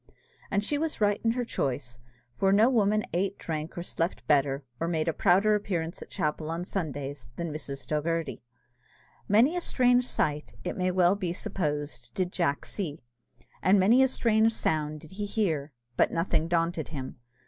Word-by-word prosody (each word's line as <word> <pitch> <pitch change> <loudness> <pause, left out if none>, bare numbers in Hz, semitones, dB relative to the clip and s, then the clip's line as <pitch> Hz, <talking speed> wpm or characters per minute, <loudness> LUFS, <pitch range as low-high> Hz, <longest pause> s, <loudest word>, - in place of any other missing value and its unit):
And 200 0 +1
she 290 +7 0
was 320 0 -2
right 205 -1 +2
in 225 0 +3
her 250 0 -1
choice; 130 - -3 0.4
for 195 +6 +2
no 215 +6 +5
woman 215 -3 +3
ate, 195 +3 0
drank, 155 0 -5
or 175 - -3
slept 170 0 -2
better, 140 -1 +2
or 165 - -1
made 160 -2 0
a 165 - +2
prouder 200 +7 +4
appearance 180 -5 -2
at - - -9
chapel 155 -3 -2
on 170 +2 -3
Sundays, 145 - -4
than 170 -3 -4
Mrs. 140 -3 -5
Dogherty. 165 +2 -1 0.9
Many 235 - +4
a 355 - -1
strange 250 -4 +3
sight, 150 -9 -1
it 180 - -3
may 185 0 0
well 180 0 +4
be 185 -4 -2
supposed, 145 -8 -3
did 185 -1 -1
Jack 155 -7 0
see, 165 -7 -4 0.6
and 195 +2 +5
many 225 +7 +5
a 265 - +6
strange 225 -3 +2
sound 155 -4 -1
did 160 - -14
he 205 +2 -4
hear, 160 -9 -1 0.3
but - - +4
nothing 165 -1 0
daunted 165 -1 0
him. 135 -6 -6
175 Hz, 175 wpm, -28 LUFS, 150-205 Hz, 0.9 s, a